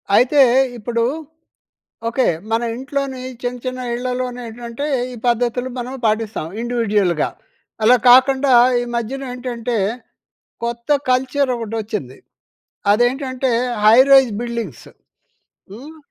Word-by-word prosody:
అయితే 270 +5 +4 0.4
ఇప్పుడు 235 +1 -2 1.1
ఓకే. 250 +2 +1 0.2
మన 225 +1 +1
ఇంట్లోని 270 0 -4 0.2
చిన్న 250 0 -3
చిన్న 255 0 -4
ఇళ్లలోనేంటంటే 245 0 -4 0.3
ఈ - - -9
పద్ధతులు 245 +1 0
మనం 250 +2 -5
పాటిస్తాం. 215 -5 -1
ఇండివిడ్యువల్‍గా. 210 -8 0 0.5
అలా 240 +4 +6
కాకుండా 265 +2 +5 0.3
ఈ - - -2
మధ్యనేంటంటే 245 -1 -4 0.9
కొత్త 235 0 -5 0.2
కల్చర్ 260 +2 +1
ఒకటి 225 -2 -6
వచ్చింది. 205 - -5 0.8
అదేంటంటే 255 +3 0 0.3
హై 220 +2 +7
రైజ్ 265 -3 +7
బిల్డింగ్స్. 235 - -5 0.9
హ్మ్. 280 +9 -11
245 Hz, 95 wpm, -19 LUFS, 230-255 Hz, 1.1 s, హై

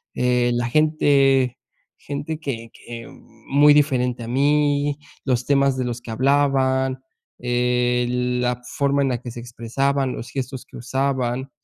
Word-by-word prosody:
eh, 125 -1 +2
la 120 0 0
gente, 135 -3 +3 0.4
gente 145 +2 -5
que 115 -7 -5
que 115 -1 -9 0.4
muy 145 +1 +6
diferente 125 -5 +1
a 115 - -7
mí, 145 +2 +2 0.3
los 125 -2 0
temas 140 -2 +2
de 130 - -1
los 120 0 -3
que 115 - -8
hablaban, 130 0 +2 0.4
eh, 125 0 +1
la 125 0 -1 0.2
forma 140 0 +2
en 135 - +1
la 125 - -1
que 120 - -7
se 120 - -8
expresaban, 130 +3 -1
los 115 - -7
gestos 130 -1 -4
que - - -12
usaban. 130 0 -1
130 Hz, 145 wpm, -22 LUFS, 125-140 Hz, 0.4 s, muy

